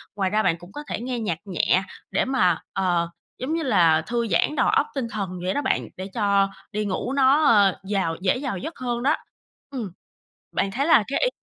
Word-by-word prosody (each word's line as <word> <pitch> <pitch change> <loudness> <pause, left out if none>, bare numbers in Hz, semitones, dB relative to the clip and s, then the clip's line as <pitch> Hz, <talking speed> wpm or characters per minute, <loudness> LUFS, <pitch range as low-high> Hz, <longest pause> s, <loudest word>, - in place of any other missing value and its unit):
Ngoài 195 -2 0
ra 215 +2 +1
bạn 165 - +2
cũng 175 +2 -14
có 295 - -7
thể - - -3
nghe 250 0 -3
nhạc 205 -8 -2
nhẹ 185 0 +1 0.3
để - - +1
mà, 210 -11 +2
ờ, 175 -3 +1 0.3
giống 265 +5 -3
như 330 0 -1
là 170 - +4
thư 235 -1 -1
giãn 195 - +1
đầu - - +2
óc - - +3
tinh 265 -4 -1
thần 200 -3 -3
vậy 185 +1 0
đó 285 - 0
bạn, - - 0
để 185 +1 -5
cho 200 -3 +2 0.2
đi 210 0 -2
ngủ 205 +6 -2
nó, 275 +2 +4
ơ, 200 -6 +5
vào 190 -5 0
dễ 190 +6 +2
vào 260 -9 -2
giấc 320 - -6
hơn 240 -1 -2
đó. 290 +4 +3 0.5
Ừm, 240 -9 -5 0.6
bạn 195 - +1
thấy 265 +8 -1
là 310 -8 +6
cái 275 - -1
ý - - +3
210 Hz, 220 wpm, -24 LUFS, 185-260 Hz, 0.6 s, là